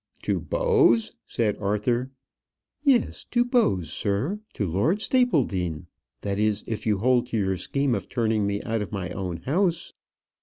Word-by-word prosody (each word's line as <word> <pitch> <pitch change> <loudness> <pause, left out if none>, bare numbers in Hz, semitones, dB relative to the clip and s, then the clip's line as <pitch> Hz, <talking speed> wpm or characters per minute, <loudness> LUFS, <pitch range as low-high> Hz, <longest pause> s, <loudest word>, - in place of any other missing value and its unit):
"To - - 0
Bowes!" 415 - +3 0.2
said 110 -4 0
Arthur. 105 +5 0 0.7
"Yes, 265 -6 +2
to 240 0 +1
Bowes, 225 - +1
sir; 110 - -1
to 105 - -1
Lord 100 - +1
Stapledean. 115 - +1 0.4
That 100 0 -2
is, 105 -1 +1
if 110 0 -4
you 105 -2 +3
hold 125 +3 +2
to 115 - -2
your 95 -2 +1
scheme 140 +6 0
of 100 -5 -3
turning 110 -4 +1
me 100 0 -2
out 115 -1 -1
of 105 - -5
my 95 -3 -4
own 90 -3 -4
house." 170 - 0
115 Hz, 155 wpm, -25 LUFS, -, 0.7 s, Bowes